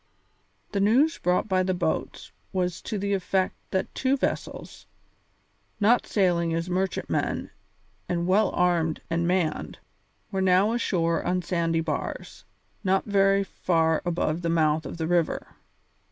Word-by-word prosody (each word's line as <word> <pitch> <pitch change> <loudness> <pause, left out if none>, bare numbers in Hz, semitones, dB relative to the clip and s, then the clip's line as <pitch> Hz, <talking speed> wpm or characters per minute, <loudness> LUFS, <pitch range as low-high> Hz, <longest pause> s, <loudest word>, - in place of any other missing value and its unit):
The 200 - -1
news 255 +11 +3
brought 180 +4 +1
by 185 -2 +2
the 185 0 0
boats 175 - -3 0.2
was 180 -2 -1
to 215 - -4
the 200 +1 -1
effect 190 0 0 0.2
that 190 - -2
two 265 +1 +1
vessels, - - -4 0.9
not 225 +3 +3
sailing 170 -4 +1
as 165 +1 -2
merchantmen 190 +1 -1 0.6
and 170 -1 0
well 190 +2 +3
armed 170 -3 +1
and 170 +1 +1
manned, 175 -4 -1 0.5
were 195 -2 -1
now 190 +3 +4
ashore 170 -8 0
on 180 0 0
sand 165 -2 0
bars, 150 -3 -5 0.4
not 190 0 +2
very 195 -1 +3
far 165 -4 +1
above 170 -2 -1
the 170 - -1
mouth 155 -1 +2
of - - -7
the 160 - -2
river. 170 -1 0
180 Hz, 140 wpm, -26 LUFS, 165-195 Hz, 0.9 s, now